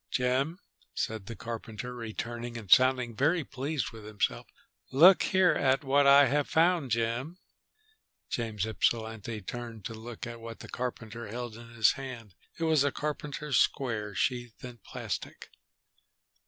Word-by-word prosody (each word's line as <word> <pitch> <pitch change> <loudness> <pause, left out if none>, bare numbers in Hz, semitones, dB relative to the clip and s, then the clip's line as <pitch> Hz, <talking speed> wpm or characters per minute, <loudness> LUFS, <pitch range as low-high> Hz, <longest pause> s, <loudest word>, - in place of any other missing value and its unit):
"Jim," 130 +6 0 0.4
said 110 -3 -3
the 115 - -6
carpenter, 115 +1 -6
returning 120 0 -5
and 105 -5 -9
sounding 130 -2 +5
very 160 +7 +2
pleased 135 +1 -3
with 110 -2 -11
himself, 105 - -2 0.4
"look 175 +8 +8
here 185 -2 +4
at 135 +2 +2
what 140 +1 +4
I 140 +1 +8
have 145 +2 +1
found, 165 -3 +3
Jim." 120 +8 -1 0.9
James 110 -4 -2
Ypsilanti 110 -1 -1
turned 115 -1 -7
to - - -4
look 115 +1 -7
at 120 -1 -8
what 115 0 -8
the - - -11
carpenter 120 -2 -5
held 120 +1 -5
in 115 0 -11
his 115 -2 +4
hand. 125 -7 -8 0.2
It 165 - -3
was 160 -3 +4
a 145 - +1
carpenter's 150 -1 -2
square 105 -6 0
sheathed 120 +2 -2
in 120 -2 -9
plastic. - - -6
120 Hz, 145 wpm, -30 LUFS, 115-140 Hz, 0.9 s, look